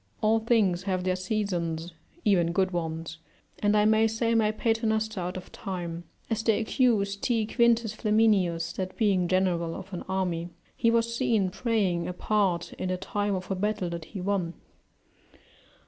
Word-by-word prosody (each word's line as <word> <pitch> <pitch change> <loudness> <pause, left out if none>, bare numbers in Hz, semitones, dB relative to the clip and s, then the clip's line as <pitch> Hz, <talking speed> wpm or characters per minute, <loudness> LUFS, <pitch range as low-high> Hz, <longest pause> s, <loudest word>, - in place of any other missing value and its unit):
All 220 +1 +3
things 220 -6 +2
have 185 -1 0
their 185 0 +1
seasons, 180 -4 -2 0.3
even 175 -5 +3
good 190 0 +2
ones, 165 -1 -4 0.4
and 210 0 +3
I 210 - +4
may 220 +1 +4
say 230 +1 0
my 220 -2 +3
Paternoster 220 -1 0
out 180 +1 -3
of 185 - -10
time; 175 -3 -5 0.2
as 225 -1 -1
they 225 -1 +2
accused 215 -4 +1
T. 230 -3 +1
Quintus 235 -1 +2
Flaminius, 200 -7 +2
that 185 -1 -4
being 195 -5 +2
general 175 -3 +1
of 190 +1 -9
an 180 - -4
army, 180 -3 -1 0.3
he 230 - +2
was 230 0 +1
seen 210 -5 +1
praying 195 -7 0
apart 180 -1 0
in 185 - -2
the 185 - 0
time 205 +2 -1
of 185 +1 -5
a - - +1
battle 200 -2 -1
that 170 -2 -5
he 190 +2 -7
won. 180 -3 -1
195 Hz, 165 wpm, -27 LUFS, 180-220 Hz, 0.4 s, I